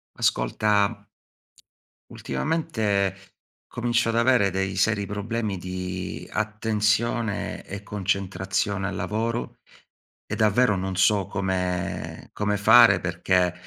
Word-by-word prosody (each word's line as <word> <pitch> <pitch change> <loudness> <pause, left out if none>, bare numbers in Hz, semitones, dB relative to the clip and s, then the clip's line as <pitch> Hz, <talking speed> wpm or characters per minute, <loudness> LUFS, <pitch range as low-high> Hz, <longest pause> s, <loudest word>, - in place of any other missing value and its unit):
Ascolta 105 0 +1 1.1
ultimamente 110 - -1 0.5
comincio 120 0 0
ad 115 - 0
avere 115 -5 +4
dei 95 +1 -2
seri 100 +1 +1
problemi 105 0 -3
di 90 0 -5
attenzione 110 +1 -1
e 100 0 -7
concentrazione 95 0 -2
al - - -4
lavoro, 115 +2 -3 0.7
e - - -3
davvero 110 +1 +3
non 95 0 -3
so 100 +1 +3
come 90 -2 -3
come 105 0 0
fare 110 +4 +7
perché 90 0 +1
100 Hz, 95 wpm, -25 LUFS, 95-110 Hz, 1.1 s, fare